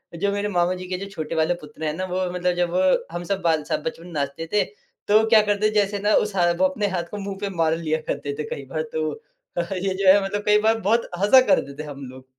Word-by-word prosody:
जो 200 +4 0
मेरे 205 +1 -1
मामा 175 -1 +1
जी 185 0 -8
के 185 - -3
जो 195 - -6
छोटे 165 -3 -5
वाले 160 +2 +2
पुत्र 150 +1 -11
हैं 150 - -1
ना, 185 +3 -3
वो 185 0 -2
मतलब 180 0 0
जब 180 +1 +2
हम 175 +1 -4
सब 195 +1 -2
बाल 160 -3 +1
सब 150 - -2
बचपन 165 +2 -5
नाचते 145 +1 -3
थे 210 - +4 0.4
तो 215 +2 +5
क्या 220 -2 +7
करते, 210 0 +1
जैसे 205 -1 +1
ना 205 +1 +2
उस 210 -1 +1
हाथ 175 -2 +3
वो 185 - +3
अपने 205 +2 0
हाथ 180 -3 -2
को 210 - -5
मुँह 195 -1 -5
पे 200 - -2
मार 165 -1 +2
लिया 160 -1 -1
करते 140 0 -3
थे 150 - -1
कई 140 - -5
बार 155 - 0
तो 155 -1 -1 0.5
अ, - - +3
ये 190 +1 -1
जो 190 0 -1
है 200 0 +3
मतलब 205 +1 -3
कई 210 0 +5
बार 225 +1 +2
बहुत 225 +3 +1
हँसा 210 +7 +7
कर - - +5
देते 140 +2 -8
हम 140 -2 -8
लोग। 130 0 -13
185 Hz, 260 wpm, -23 LUFS, 160-200 Hz, 0.5 s, क्या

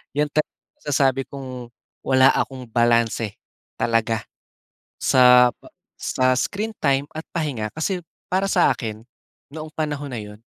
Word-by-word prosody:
yun 150 0 +1
tala 155 - +1 0.3
masasabi 135 -2 +1
kong 130 -3 -8 0.4
wala 130 0 +6
akong 130 -1 -2
balanse 115 -2 +2 0.4
talaga 115 -1 +1 0.8
sa 125 -1 +7 0.5
sa 130 0 +1
screen 205 +11 -2
time 140 0 +1
at 160 +1 -8
pahinga, 135 -10 -2
kasi 180 +4 -1 0.3
para 190 +2 +1
sa 185 -2 +4
akin, 110 -3 -4 0.5
noong 155 +1 -8
panahon 145 -2 -3
na 115 - -3
yun, 105 0 -11
130 Hz, 125 wpm, -22 LUFS, 120-150 Hz, 0.8 s, sa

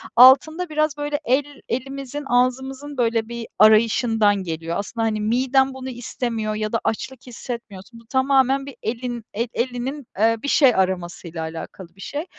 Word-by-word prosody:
altında 285 +8 +6
biraz, 305 -1 0
böyle, 290 0 -2
el 280 +3 0
elimizin, 270 +3 -4
ağzımızın, 265 +3 0
böyle, 230 -2 +1
bir 235 -1 -6
arayışından 220 0 +5
geliyor. 165 0 -4
Aslında, 225 +3 -3
hani, 215 -1 -1
miden 265 +4 +2
bunu 260 0 -7
istemiyor 230 -3 -3
ya 215 0 -2
da 230 - +1
açlık 260 +3 -4
hissetmiyorsun. 230 -3 -8
Bu 230 - -19
tamamen 270 +1 +2
bir 280 - -9
elin, 240 +1 -4
el 230 +4 -1
elinin, 250 +2 -3
eee, 225 +2 +4
bir - - -3
şey 275 -4 +5
aramasıyla 180 -3 -2
alakalı 165 +2 -8
bir 195 - -15
şey. 290 - -4
245 Hz, 155 wpm, -22 LUFS, 220-270 Hz, -, altında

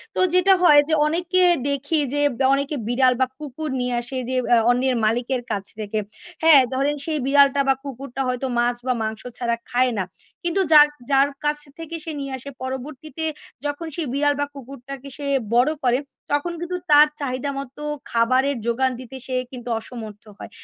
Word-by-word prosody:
তো - - -1
যেটা 365 +1 +5
হয় 300 -4 +8
যে, - - +1
অনেকে 350 +3 +2 0.3
দেখি 285 +3 0
যে, 290 - 0 0.2
দ্যা 265 - +3
অনেকে 280 +2 -2
বিড়াল 255 +1 +3
বা - - +5
কুকুর 300 +1 -6
নিয়ে 250 0 -1
আসে 240 +2 -5
যে, 260 - -1 0.2
আ - - +5
অন্যের 255 +1 +1
মালিকের 240 +3 0
কাছ 200 -2 -2
থেকে। 215 0 -3 0.5
হ্যাঁ, 315 -4 +8
ধরেন 280 +3 0
সেই 315 -2 -1
বিড়াল, 280 +1 +6
বিড়াল 280 -1 +2
বা - - +6
কুকুরটা 270 -1 -6
হয়তো 255 +1 -2
মাছ 240 0 +1
বা 255 - +3
মাংস 220 0 -4 0.2
ছাড়া 235 -1 0
খায় 250 +1 +2
না। 190 - +1 0.4
কিন্তু 345 +3 +1
যার, 300 -1 +9 0.2
যার, 275 +1 +5 0.2
কাছ 295 0 +2 0.2
থেকে 330 0 -5
সে 325 - -4
নিয়ে 275 -1 -5
আসে 260 +2 -9
পরবর্তীতে 270 +4 -5 0.4
যখন 290 +3 -3
সে 340 - -2
বিড়াল 290 +1 +2
বা 285 - +1
কুকুরটাকে 275 0 -9
সে 290 - -6 0.3
বড় 250 +5 +4
করে 245 +1 +3 0.3
তখন 290 +4 0
কিন্তু 355 +1 -3
তার 295 +1 +8
চাহিদা 260 0 -2
মতো 275 +1 -9 0.3
খাবারের 255 +4 +2
যোগান 255 +3 +1
দিতে 255 0 -10
সে 260 - -3 0.2
কিন্তু 245 -2 -8
অসমর্থ 220 -3 -9
হয়। - - -9
270 Hz, 185 wpm, -22 LUFS, 250-295 Hz, 0.5 s, যার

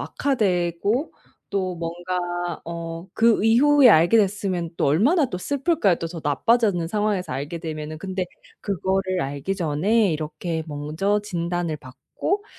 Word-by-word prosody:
악화되고 205 - 0 0.4
또 185 -2 -1
뭔가 175 +1 -3
어 170 +1 -6
그 225 -2 +3
이후에 270 +4 +6
알게 175 +2 +6
됐으면 190 -4 0
또 - - 0
얼마나 245 - +3
또 180 - -3
슬플까요 280 - +1
또 165 - -4
더 165 0 -7
나빠지는 200 +3 +2
상황에서 205 -3 -1
알게 145 +6 -4
되면은. 155 -2 -5
근데 185 +1 -3 0.3
그거를 190 -1 -1
알기 140 +7 -3
전에 180 +5 +2
이렇게 160 +2 -3
먼저 155 +8 -1
진단을 175 -4 -2
받고 140 - -4
180 Hz, 285 characters per minute, -23 LUFS, 165-210 Hz, 0.4 s, 이후에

